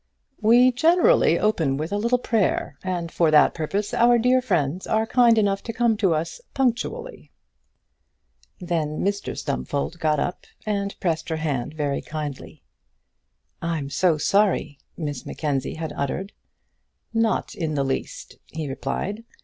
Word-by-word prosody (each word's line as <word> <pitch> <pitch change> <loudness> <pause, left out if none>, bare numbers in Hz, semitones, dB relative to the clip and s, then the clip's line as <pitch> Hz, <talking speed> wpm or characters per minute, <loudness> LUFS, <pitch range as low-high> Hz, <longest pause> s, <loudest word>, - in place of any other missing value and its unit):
"We 240 +4 +6
generally 340 - +4
open 160 -11 +1
with 155 +4 -4
a 205 - 0
little 235 +4 +2
prayer, 225 -5 0
and 175 -3 -3
for 165 -2 +2
that 150 -1 +5
purpose 195 +6 -3
our 240 +1 +5
dear 250 +2 +3
friends 170 - -1
are 220 0 +1
kind 240 -1 +4
enough 200 -2 +2
to 230 - -4
come 230 -1 +2
to 190 -6 +2
us 165 - -4
punctually." 255 -4 -2 1.3
Then 160 -4 -2
Mr 200 0 -2
Stumfold 140 - -3
got 155 -2 +1
up, 175 - -3 0.2
and 200 -2 -2
pressed 165 -3 -1
her 160 - -1
hand 150 -3 -3
very 145 -2 -1
kindly. 150 -3 -7 1.0
"I'm 160 -4 -3
so 175 -1 +2
sorry," 195 -5 +1 0.2
Miss 145 -6 -4
Mackenzie 140 -4 -3
had 160 -2 -5
uttered. 185 +8 -3 0.8
"Not 225 -1 0
in 160 -3 -3
the 140 - +1
least," 135 -1 -4
he 160 -2 -4
replied. 200 +10 -4
175 Hz, 140 wpm, -24 LUFS, 150-220 Hz, 1.3 s, We